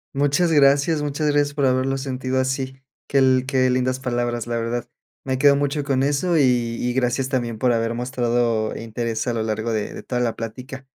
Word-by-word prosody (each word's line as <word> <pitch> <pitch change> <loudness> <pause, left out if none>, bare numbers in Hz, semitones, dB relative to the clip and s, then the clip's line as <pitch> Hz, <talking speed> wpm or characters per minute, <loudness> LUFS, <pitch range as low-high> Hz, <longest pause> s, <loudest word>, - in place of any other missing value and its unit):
Muchas 145 +5 +2
gracias. 145 +1 +4
Muchas 150 +1 -2
gracias 145 -1 +1
por 140 -2 +1
haberlo 130 +1 +1
sentido 130 -1 -2
así. 130 0 -2 0.3
Qué 140 - 0
l 130 -1 +4
qué 130 -2 +2
lindas 130 0 0
palabras, 120 -2 -2
la 120 0 -2
verdad. 115 +1 -3 0.4
Me 130 -1 -2
quedo 140 0 +6
mucho 145 +1 -1
con 135 -2 0
eso, 145 +5 +1
y 145 - +4
y 120 -1 0
gracias 130 +1 0
también 120 -4 -2
por 125 +1 +2
haber 115 0 -1
mostrado 120 -3 0
interés 115 0 -3
a 120 - -1
lo 115 - -1
largo 110 +1 -2
de 105 -1 -2
de - - -9
toda 125 -1 -2
la 115 -2 0
plática. 130 +4 -7
130 Hz, 195 wpm, -22 LUFS, 120-140 Hz, 0.4 s, quedo